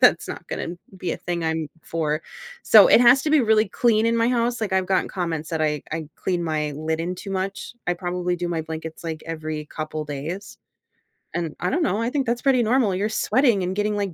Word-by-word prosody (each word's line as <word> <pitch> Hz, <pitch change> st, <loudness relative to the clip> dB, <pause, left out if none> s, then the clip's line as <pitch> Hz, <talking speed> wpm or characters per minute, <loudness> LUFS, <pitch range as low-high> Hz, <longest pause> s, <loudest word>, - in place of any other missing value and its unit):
that's -, -, +5 dB
not -, -, -7 dB
gonna 170 Hz, -, -4 dB, 0.2 s
be 185 Hz, -, -3 dB
a -, -, -3 dB
thing 175 Hz, -1 st, -3 dB
I'm 160 Hz, -1 st, -1 dB
for, 155 Hz, -1 st, -2 dB, 0.4 s
so -, -, +8 dB
it -, -, +7 dB
has 250 Hz, +2 st, +6 dB
to 305 Hz, -, -1 dB
be 310 Hz, -2 st, +5 dB
really 220 Hz, -2 st, +3 dB
clean 225 Hz, 0 st, +2 dB
in 230 Hz, 0 st, +2 dB
my 230 Hz, +1 st, +3 dB
house, 240 Hz, -1 st, 0 dB
like, 210 Hz, -3 st, -2 dB
I've 190 Hz, -1 st, +2 dB
gotten 190 Hz, 0 st, +1 dB
comments 165 Hz, -4 st, -3 dB
that 160 Hz, -1 st, -1 dB
I 150 Hz, -2 st, 0 dB
I 160 Hz, -2 st, -4 dB
clean 175 Hz, -2 st, -1 dB
my 155 Hz, -2 st, -1 dB
linen 160 Hz, +4 st, -2 dB
too 195 Hz, +2 st, -8 dB
much, 195 Hz, +4 st, -3 dB
I 175 Hz, -, +1 dB
probably 180 Hz, 0 st, -2 dB
do 175 Hz, 0 st, -3 dB
my 165 Hz, -2 st, -1 dB
blankets, 160 Hz, +1 st, -7 dB
like, 160 Hz, -1 st, -4 dB
every 155 Hz, -2 st, -4 dB
couple 155 Hz, 0 st, -5 dB
days. 155 Hz, +8 st, -6 dB, 0.8 s
And, 170 Hz, -3 st, -2 dB
I -, -, 0 dB
don't 335 Hz, +3 st, +1 dB
know, 210 Hz, -5 st, 0 dB
I 230 Hz, -, 0 dB
think 275 Hz, 0 st, -1 dB
that's 235 Hz, +1 st, -1 dB
pretty 260 Hz, -3 st, +3 dB
normal, 225 Hz, -4 st, +2 dB
you're 205 Hz, +3 st, 0 dB
sweating 235 Hz, -2 st, +2 dB
and 185 Hz, +1 st, -2 dB
getting, 210 Hz, +1 st, 0 dB
like, 200 Hz, -3 st, -2 dB
180 Hz, 225 wpm, -23 LUFS, 160-220 Hz, 0.8 s, so